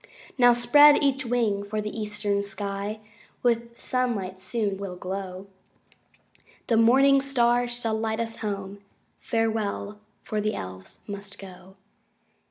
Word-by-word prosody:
Now 245 -2 +6
spread 290 +5 +6
each 265 -2 +1
wing, 230 -4 +1
for 210 +1 -4
the 210 0 -4
eastern 210 -2 -1
sky 200 +1 -4 0.4
With 235 -1 0
sunlight 215 -8 -2
soon 200 +1 -2
will 195 -2 -6
glow. 185 +1 -6 1.2
The 230 - +1
morning 270 +4 +5
star 245 -3 +2
shall 240 -2 -2
light 220 0 -1
us 225 -1 -3
home: 200 -2 -5 0.4
Farewell! 220 -2 -2 0.2
for 215 -1 -2
the 215 +1 -1
Elves 95 0 -8
must 200 -1 -7
go. 190 0 -13
215 Hz, 125 wpm, -26 LUFS, 200-240 Hz, 1.2 s, Now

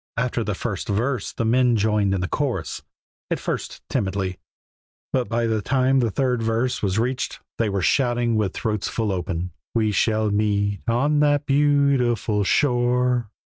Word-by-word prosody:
After 120 0 0
the 105 -3 -2
first 100 -2 -4
verse 115 +3 -1
the 115 - -3
men 125 +1 +3
joined 105 -2 +2
in 95 - -2
the 90 - -1
chorus; 120 - -2 0.5
at - - -1
first - - -5
timidly, 95 -2 -2 0.7
but 130 -2 0
by 115 0 0
the 110 -2 0
time 130 +3 +2
the 120 -3 +2
third 125 +1 0
verse 115 +3 0
was 95 -1 0
reached 125 +3 -1 0.2
they 115 -2 +2
were 100 -2 -1
shouting 120 - +2
with 105 -3 0
throats 105 -2 -2
full 110 -3 -1
open, 90 -1 -3 0.2
"We 110 -2 +2
shall 110 +1 +1
meet 100 -1 0
on 140 +6 +2
that 145 -1 +3
beautiful 135 -7 +2
shore." 125 -1 +2
115 Hz, 160 wpm, -23 LUFS, 105-125 Hz, 0.7 s, men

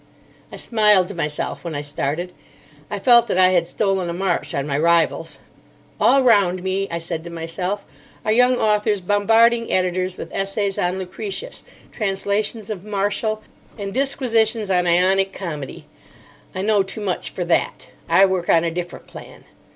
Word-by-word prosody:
I - - -8
smiled 210 -5 +3
to - - -5
myself 150 -4 -2
when 165 -3 -5
I 145 - -2
started. 150 +5 -3 0.6
I 205 - -3
felt 235 +2 +5
that - - -1
I 185 0 +6
had 175 -2 +2
stolen 195 -2 -1
a - - -3
march 180 0 -2
on 140 - -1
my 140 -2 -2
rivals. 170 0 +1 0.6
"All 275 0 +4
round 195 -7 +3
me," 190 +1 -1
I 170 - -3
said 165 -1 -3
to 170 - -8
myself, 170 +4 -4 0.4
"are 215 - +1
young 250 +3 +4
authors 210 -1 +1
bombarding 225 +5 +3
editors 185 0 0
with - - -8
essays 195 0 -2
on 180 +1 0
Lucretius, 200 - -6 0.3
translations 205 +1 -2
of 190 -4 -6
Martial, 210 +1 -2 0.3
and 200 -2 -5
disquisitions 230 -6 +1
on 180 -1 +2
Ionic 190 +3 +2
comedy. 150 -8 -7 0.7
I 185 - -2
know 210 -1 +3
too 195 +3 -5
much 190 -3 -2
for - - -4
that. - - -1 0.2
I 195 - +6
work 185 -2 -2
on 165 - +4
a 170 - -1
different 175 +1 -6
plan." - - -12
195 Hz, 165 wpm, -21 LUFS, 175-215 Hz, 0.7 s, I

